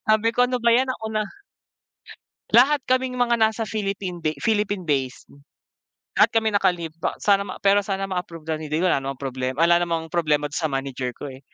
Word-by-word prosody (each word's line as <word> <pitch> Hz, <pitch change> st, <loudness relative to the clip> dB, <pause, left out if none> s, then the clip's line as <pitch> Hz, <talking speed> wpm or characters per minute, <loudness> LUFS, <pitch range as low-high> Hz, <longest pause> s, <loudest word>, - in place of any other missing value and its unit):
Sabi 220 Hz, +1 st, +3 dB
ko, 245 Hz, -, +4 dB
"Ano 250 Hz, 0 st, +1 dB
ba 235 Hz, -1 st, +3 dB
'yan, 260 Hz, +2 st, +2 dB
ako 220 Hz, -3 st, -5 dB
na" 215 Hz, -, +1 dB, 1.3 s
Lahat 270 Hz, +3 st, +5 dB
kaming 255 Hz, 0 st, 0 dB
mga 240 Hz, -1 st, +1 dB
nasa 220 Hz, +1 st, +2 dB
Philippine 195 Hz, -4 st, -4 dB
de 155 Hz, -1 st, -1 dB
Philippine-base. 180 Hz, -, -1 dB, 0.9 s
Lahat -, -, +6 dB
kami 220 Hz, -1 st, +2 dB
naka-leave 180 Hz, -5 st, 0 dB
pa -, -, -2 dB
sana 200 Hz, -1 st, +3 dB
ma -, -, -6 dB
pero 200 Hz, +1 st, +5 dB
sana 195 Hz, -1 st, -3 dB
ma-approve, 175 Hz, -3 st, -5 dB
ganoon 155 Hz, -1 st, -3 dB
din, 160 Hz, +3 st, +1 dB
wala 185 Hz, -6 st, +3 dB
namang 135 Hz, 0 st, -6 dB
problema 130 Hz, -1 st, -3 dB
wala 170 Hz, 0 st, +5 dB
namang 165 Hz, -2 st, -2 dB
problema 150 Hz, -3 st, +1 dB
dun -, -, -3 dB
sa 160 Hz, -, 0 dB
manager 135 Hz, -2 st, -3 dB
ko 145 Hz, +2 st, -7 dB
eh. 130 Hz, -, -12 dB
185 Hz, 185 wpm, -23 LUFS, 155-220 Hz, 1.3 s, Lahat